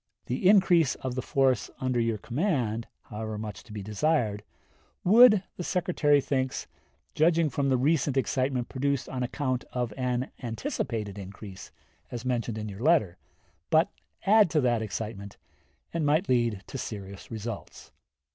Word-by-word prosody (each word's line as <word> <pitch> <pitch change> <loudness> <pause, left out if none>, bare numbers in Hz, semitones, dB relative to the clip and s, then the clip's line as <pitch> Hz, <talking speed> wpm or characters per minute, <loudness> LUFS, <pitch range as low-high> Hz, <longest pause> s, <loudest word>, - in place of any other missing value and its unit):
The 130 +10 +2
increase 180 -7 +5
of 130 -1 -4
the 130 - -2
force 130 -5 +1
under 130 -2 0
your 115 -1 +1
command, 120 - -1 0.2
however 110 0 -5
much 105 -2 -6
to 120 - -14
be 105 -2 -6
desired, 110 0 0 0.6
would, 215 0 +7
the 180 - -4
Secretary 165 -5 +2
thinks, 130 -1 -1 0.5
judging 165 -1 +3
from 140 +2 0
the 130 - +3
recent 140 0 +1
excitement 130 -1 0
produced 140 0 -1
on 130 - -4
account 130 0 -1
of 125 -3 -2
an 125 0 -1
anticipated 110 -3 -3
increase, 95 0 -9 0.4
as 120 0 -6
mentioned 120 -3 -1
in 110 0 -4
your 100 +1 -8
letter, 130 - +3 0.5
but 160 +4 +4 0.4
add 210 -1 +6
to 155 -2 +2
that 120 -3 +2
excitement 105 -2 -5 0.6
and 165 -1 -1
might 155 +6 +2
lead 120 -5 +1
to 135 - -6
serious 100 -4 -7
results." 110 -2 -7
125 Hz, 145 wpm, -28 LUFS, 110-150 Hz, 0.6 s, would